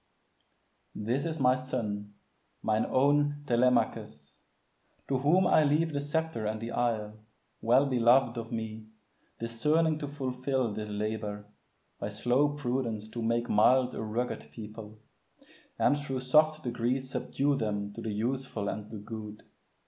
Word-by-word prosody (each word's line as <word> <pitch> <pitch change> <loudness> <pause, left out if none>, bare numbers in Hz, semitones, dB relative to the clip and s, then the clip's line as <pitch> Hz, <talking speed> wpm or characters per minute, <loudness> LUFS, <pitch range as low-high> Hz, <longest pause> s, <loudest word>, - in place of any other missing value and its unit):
This 120 +7 -1
is 160 -1 -3
my 125 -1 +5
son, 105 -6 -4 0.5
mine 110 0 +1
own 145 +2 +2
Telemachus, 120 - 0 0.7
To 135 -2 0
whom 170 +8 +4
I 155 - +5
leave 155 +2 +2
the 140 - -1
sceptre 150 -6 -2
and 110 0 -2
the 115 +1 -5
isle, 110 -3 -1 0.4
Well 125 +5 +4
beloved 125 -1 +4
of 115 0 -6
me, 110 -1 -5 0.5
discerning 150 +8 +1
to 145 - -4
fulfil 130 -3 -2
This 105 0 -5
labor, 105 0 -3 0.5
by - - -3
slow 130 +4 +2
prudence 120 -6 -2
to 120 +1 -5
make 115 +1 0
mild 125 +4 +4
A - - -4
rugged 115 +3 -3
people, 110 -1 -9 0.8
and - - +4
thro' 145 -2 -3
soft 155 +4 +3
degrees 125 +2 -1
Subdue 140 +1 0
them 105 -3 -2
to - - -7
the 110 - -3
useful 115 -1 -2
and 105 0 -5
the 110 - -7
good. 105 0 -8
120 Hz, 140 wpm, -30 LUFS, 110-140 Hz, 0.8 s, my